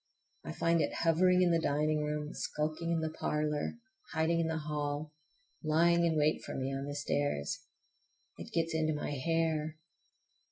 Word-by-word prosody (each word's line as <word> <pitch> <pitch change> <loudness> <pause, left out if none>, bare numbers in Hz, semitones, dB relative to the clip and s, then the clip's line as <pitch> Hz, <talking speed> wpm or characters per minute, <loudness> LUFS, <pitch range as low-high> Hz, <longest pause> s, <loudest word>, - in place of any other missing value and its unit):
I - - -5
find 170 0 +2
it - - -1
hovering 180 +2 +4
in 175 - +4
the 165 - +4
dining 150 +1 +1
room, 150 0 -3
skulking 155 +2 -2
in 165 -1 +1
the 160 0 -2
parlor, 150 +3 -1 0.4
hiding 160 +1 +2
in 165 - +1
the 160 0 -1
hall, 150 0 -3 0.5
lying 170 +2 +4
in 160 -1 +1
wait 150 +1 +2
for - - -6
me 135 +1 -2
on 135 +1 -3
the 145 - -4
stairs. 145 - -1 0.7
It - - -8
gets 165 0 0
into 155 -1 +1
my 150 - -3
hair. 160 +1 0
155 Hz, 165 wpm, -32 LUFS, 150-165 Hz, 0.7 s, hovering